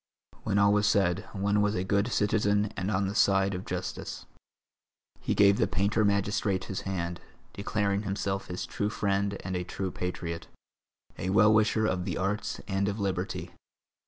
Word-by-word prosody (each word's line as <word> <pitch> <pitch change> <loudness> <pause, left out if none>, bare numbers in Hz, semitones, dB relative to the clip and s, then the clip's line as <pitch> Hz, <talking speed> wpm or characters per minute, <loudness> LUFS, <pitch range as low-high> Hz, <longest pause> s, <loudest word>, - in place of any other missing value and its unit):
When 100 - 0
all 100 0 +5
was 105 0 +3
said, 95 -1 +2
one 100 +1 +1
was 105 +1 +1
a 90 - 0
good 100 +3 +1
citizen 105 0 +1
and 95 -1 -2
on 100 -1 +1
the 100 - -3
side 100 -2 +3
of 90 +1 -5
justice. - - -5 0.9
He - - -1
gave 100 0 +5
the - - +3
painter 105 +3 +1
magistrate 100 -1 +1
his 95 - -4
hand, 85 -2 -3 0.3
declaring 100 0 -1
himself 100 -1 -2
his 90 0 -4
true 105 - -2
friend 100 -1 0
and 95 -1 -2
a 90 - -1
true 95 +1 -4
patriot, 85 -2 -4 0.7
a 90 - -2
well 105 +2 +5
wisher 110 0 +3
of 90 -4 0
the 90 - -2
arts 105 +3 -2
and 100 0 0
of 100 +2 -2
liberty. 95 -1 -2
100 Hz, 170 wpm, -29 LUFS, 95-105 Hz, 0.9 s, all